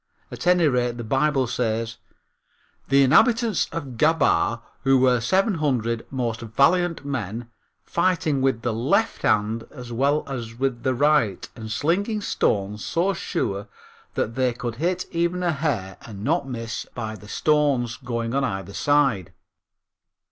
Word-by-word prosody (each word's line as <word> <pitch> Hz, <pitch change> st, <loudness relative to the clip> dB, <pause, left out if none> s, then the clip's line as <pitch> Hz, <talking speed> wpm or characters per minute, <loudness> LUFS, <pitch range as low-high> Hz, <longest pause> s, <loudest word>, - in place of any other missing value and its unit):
At -, -, -6 dB
any 180 Hz, -2 st, +5 dB
rate 125 Hz, -3 st, 0 dB
the 120 Hz, -, -5 dB
Bible 135 Hz, +3 st, +1 dB
says: 115 Hz, -1 st, -2 dB, 0.9 s
"The 140 Hz, 0 st, +5 dB
inhabitants 225 Hz, -, +4 dB
of 135 Hz, -7 st, -6 dB
Gabaa, 140 Hz, -6 st, +2 dB, 0.2 s
who 135 Hz, 0 st, +5 dB
were 125 Hz, -1 st, +4 dB
seven 190 Hz, -, +2 dB
hundred 115 Hz, -5 st, 0 dB
most 120 Hz, -4 st, -2 dB
valiant 155 Hz, +8 st, +2 dB
men, 120 Hz, -3 st, -4 dB, 0.3 s
fighting 170 Hz, -5 st, +1 dB
with 130 Hz, -4 st, +1 dB
the 120 Hz, -, 0 dB
left 135 Hz, -, +1 dB
hand 110 Hz, +2 st, +1 dB
as 125 Hz, -4 st, -10 dB
well 140 Hz, +5 st, +2 dB
as 120 Hz, -4 st, -5 dB
with 130 Hz, -2 st, -1 dB
the 130 Hz, 0 st, 0 dB
right 140 Hz, -8 st, +2 dB
and 110 Hz, -1 st, -7 dB
slinging 195 Hz, -, 0 dB
stones 105 Hz, -, -1 dB
so 185 Hz, +4 st, 0 dB
sure 100 Hz, -, -3 dB, 0.5 s
that 115 Hz, -, -1 dB
they 130 Hz, 0 st, +1 dB
could 120 Hz, -1 st, -5 dB
hit 180 Hz, +5 st, -1 dB
even 170 Hz, +1 st, 0 dB
a 175 Hz, -, +2 dB
hair, 125 Hz, -, -2 dB
and 105 Hz, -3 st, -9 dB
not 155 Hz, +3 st, 0 dB
miss 115 Hz, -2 st, -5 dB
by 110 Hz, -2 st, -4 dB
the 105 Hz, -, -13 dB
stone's 140 Hz, -6 st, +1 dB
going 115 Hz, -3 st, -3 dB
on 140 Hz, 0 st, +1 dB
either 95 Hz, -5 st, -3 dB
side." 135 Hz, -, +2 dB
130 Hz, 150 wpm, -24 LUFS, 115-150 Hz, 0.9 s, any